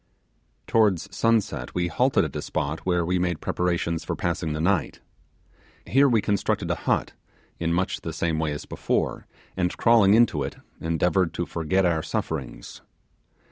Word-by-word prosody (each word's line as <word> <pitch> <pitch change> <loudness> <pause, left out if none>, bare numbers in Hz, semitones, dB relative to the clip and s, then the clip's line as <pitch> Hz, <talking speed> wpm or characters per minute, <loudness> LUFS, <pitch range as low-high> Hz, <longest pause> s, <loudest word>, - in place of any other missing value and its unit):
Towards 100 -3 +1
sunset 115 -2 0
we 90 -1 +1
halted 85 - +2
at - - -7
a - - -2
spot 75 +5 -3
where 90 -2 +2
we 90 +1 0
made 90 -3 -1
preparations 85 -2 -1
for - - -3
passing 85 -2 -2
the 75 - -3
night. 85 -2 0 0.9
Here 140 +2 +4
we 115 -4 +2
constructed 100 -1 0
a - - +1
hut, - - +1 0.5
in 85 0 0
much 90 +2 -1
the 80 - -5
same 80 0 -1
way 80 -1 0
as 75 - -5
before, - - -2 0.3
and 90 -1 -1
crawling 110 -4 +5
into 115 -10 +3
it, 70 - -4 0.2
endeavoured 85 +2 +1
to 85 - -1
forget 85 +4 0
our 85 -3 +2
sufferings. 70 -6 -5
85 Hz, 160 wpm, -25 LUFS, 80-95 Hz, 0.9 s, crawling